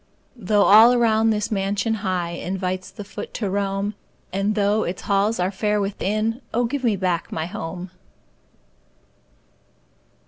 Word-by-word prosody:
Though 210 -2 +2
all 220 +5 +8
around 225 -2 +3
this 210 0 -1
mansion 200 +2 0
high 180 -4 -1
Invites 185 +1 -3
the 195 +2 -9
foot 200 - -8
to 205 -4 -2
roam, 200 +1 -1 0.4
And 200 +2 0
though 205 +1 +2
its 180 -1 -4
halls 200 +2 +1
are 180 +2 +1
fair 210 +1 0
within 215 +4 -1
Oh, 240 +1 +2
give 265 +3 -3
me 225 -4 +2
back 180 -3 -1
my 160 - -2
HOME! 175 +1 -6
200 Hz, 140 wpm, -22 LUFS, 185-215 Hz, 0.4 s, all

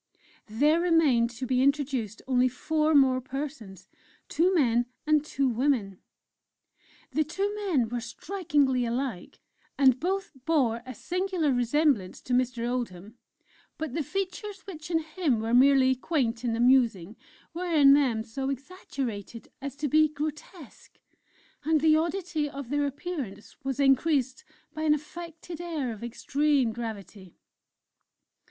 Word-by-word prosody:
There 295 +10 +2
remained 310 -9 +3
to 245 +2 -6
be 255 0 +1
introduced 265 -6 0
only 255 -1 +3
four 310 +4 0
more 260 -2 +4
persons, 255 - -7 0.4
two 350 +4 +2
men, 245 -8 +2 0.2
and 305 -1 +3
two 275 -3 -1
women. 235 -6 0 1.1
The 310 - +1
two 390 +7 -2
men 370 - 0
were 240 +1 -4
strikingly 290 - 0
alike, 240 -4 -4 0.4
and 260 -3 +5
both 385 +5 -2
bore 260 -8 +1
a 255 - -7
singular 360 - -1
resemblance 245 -4 +1
to 250 - -3
Mr. 245 -1 0
Oldham; 230 -3 -5 0.6
but 310 -5 -4
the 325 - -1
features 390 - -4
which 340 -5 -9
in 325 -2 +1
him 310 -6 0
were 225 +2 -2
merely 260 +1 +5
quaint 250 -4 -1
and 230 -2 0
amusing, 230 -6 +3 0.4
were 350 +1 -3
in 285 -4 +7
them 255 -6 +2
so 265 +4 -4
exaggerated 270 - -6
as 275 -1 -5
to 295 +1 -2
be 310 +3 +4
grotesque; 300 - -8 0.7
and 315 0 +2
the 310 +1 +4
oddity 335 -2 -1
of 275 -3 -8
their 290 0 +1
appearance 280 - -6
was 270 0 -3
increased 270 -1 +2 0.3
by 310 - -6
an 305 -1 +4
affected 335 +2 -8
air 310 -9 -3
of 215 - -11
extreme 275 +1 +1
gravity. 205 -5 -8
275 Hz, 135 wpm, -27 LUFS, 240-315 Hz, 1.1 s, in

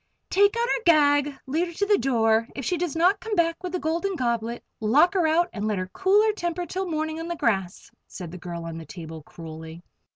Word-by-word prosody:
"Take 405 +3 +4
out 470 - +2
her - - 0
gag. 290 -4 +4
Lead 320 +7 0
her 340 - -9
to 405 - 0
the 410 -1 +3
door. 225 -3 +2
If 270 - -5
she 360 - +1
does 345 -3 -2
not 365 +5 +3
come 445 -2 -3
back 335 -2 +1
with 365 -1 -4
the 365 - -1
Golden 340 +4 -1
Goblet, 235 -3 -2 0.2
lock 270 - +4
her 360 -5 +2
out 345 +3 +2
and 210 0 -3
let 210 -2 0
her 185 0 -4
cool 390 +2 +4
her 435 -1 +2
temper 350 -3 -3
till 375 +1 -3
morning 315 0 -2
on 330 - -5
the 345 - -3
grass," 195 - -1 0.2
said 175 -4 -8
the 180 - -8
girl 170 -1 -6
on 165 0 -6
the 165 - -9
table, 160 -3 -8
cruelly. 160 +1 -10
310 Hz, 235 wpm, -25 LUFS, 215-355 Hz, 0.2 s, Take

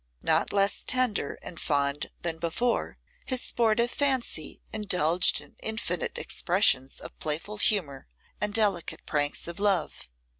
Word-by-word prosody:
Not - - +1
less 200 0 +1
tender 250 - 0
and 170 - -8
fond 140 0 0
than 165 -2 -2
before, 170 +9 -1 0.3
his 255 -2 +1
sportive 235 +1 +1
fancy 260 - -1
indulged 180 -5 +4
in - - -14
infinite 220 -6 -2
expressions 155 -8 +2
of - - -11
playful 160 +8 -2
humour 170 - 0 0.3
and 210 0 0
delicate 205 -5 0
pranks 145 0 -1
of 170 +1 -6
love. 195 - 0
190 Hz, 125 wpm, -27 LUFS, 155-220 Hz, 0.3 s, indulged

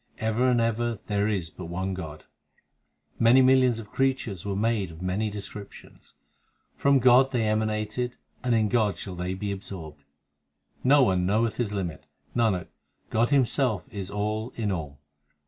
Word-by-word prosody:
Ever 110 +3 +1
and 125 -1 +3
ever 115 0 0
there 105 0 0
is 95 -6 -2
but - - -9
One 95 +3 -3
God 80 -4 -7 1.0
Many 120 +3 +6
millions 130 -2 +4
of 110 -3 -9
creatures 130 -9 -1
were 100 -1 -3
made 105 -2 0
of 80 0 -11
many 100 +4 0
descrip 100 0 -7
tions; - - -16 0.6
From 140 0 +3
God 130 +1 +5
they 115 -4 +1
emanated 110 +3 -1 0.3
and 125 -2 +2
in 110 -1 +3
God 105 -5 +1
shall 95 +1 -6
they 90 +1 -3
be 100 +1 -3
absorbed. 80 -7 -8 0.8
No 140 +2 +6
one 95 -5 +2
knoweth 110 +3 +1
His 120 -4 -1
limit; 90 -7 -4 0.3
Nanak, 110 -7 +1 0.4
God 115 +2 +2
Himself 130 -5 +2
is 100 -2 -5
all 105 +3 -2
in 105 -3 -1
all. 75 -6 -4
105 Hz, 160 wpm, -26 LUFS, 95-120 Hz, 1.0 s, Many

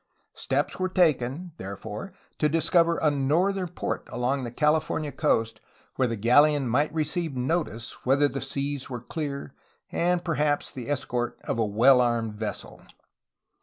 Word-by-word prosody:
Steps - - -1
were 185 0 0
taken, 165 -2 +1
therefore, 105 - -7 0.3
to 150 - +3
dis 165 +1 0
cover 170 -1 +4
a 150 - +2
northern 175 +8 +1
port - - -4
along 130 +3 -1
the 120 - -4
California 150 +2 +1
coast 115 -8 0 0.3
where 130 - +2
the 115 - -2
galleon 140 +6 +4
might 145 +6 +1
receive 160 -1 -1
notice 125 -3 -2
whether 140 +3 +4
the 135 -1 -4
seas 140 0 -3
were 125 -2 -4
clear 140 -1 -5 0.4
and 175 0 +1
perhaps 150 -3 0
the 130 0 -7
escort 130 -4 -2
of - - -2
a 115 - +3
well 125 +5 +5
armed 115 -3 0
vessel. 105 0 -6
140 Hz, 150 wpm, -26 LUFS, 120-160 Hz, 0.4 s, well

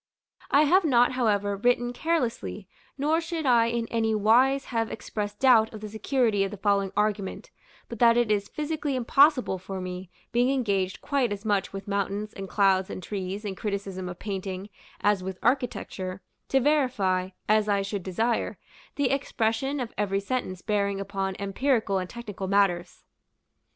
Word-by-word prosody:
I 285 +2 +5
have 365 +6 +4
not, 245 -6 +4
however, 205 -5 +1
written 245 +3 +1
carelessly; 235 - -2 0.3
nor 305 +4 +1
should 330 -2 -4
I 235 -3 +5
in 235 0 -1
any 225 -1 +1
wise 250 +6 +4
have 225 -1 0
expressed 205 -1 -5
doubt 235 -5 +5
of 215 - -9
the 215 - -6
security 220 -1 +1
of 195 - -1
the 210 - -8
following 200 -1 +1
argument, 210 -2 -1 0.4
but 235 - -8
that 235 -1 +6
it 240 -3 +2
is 205 -1 0
physically 300 -2 -2
impossible 255 -4 +3
for 190 +1 -6
me, 180 0 -6 0.2
being 245 +2 +3
engaged 200 -8 0
quite 275 -6 0
as 205 +1 -5
much 200 -3 0
with 195 0 -7
mountains, 200 +1 -2
and 195 -1 -7
clouds, 190 -2 +3
and 185 - -6
trees, 195 +2 -4
and 195 -2 -3
criticism 195 -3 -4
of 175 - -7
painting, 195 -1 -5 0.3
as 205 -2 +2
with 190 0 -5
architecture, 210 -7 -1 0.3
to 270 - +4
verify, 245 -11 +1 0.2
as 215 0 +3
I 200 -1 +2
should 200 0 -3
desire, 220 +6 -1 0.4
the 285 -3 +1
expression 270 0 0
of 245 -3 -4
every 195 -1 +1
sentence 200 -4 -3
bearing 200 -2 0
upon 195 -1 -3
empirical 200 0 0
and 185 -1 -5
technical 210 -5 -6
matters. 185 -3 +1
210 Hz, 165 wpm, -27 LUFS, 195-245 Hz, 0.4 s, that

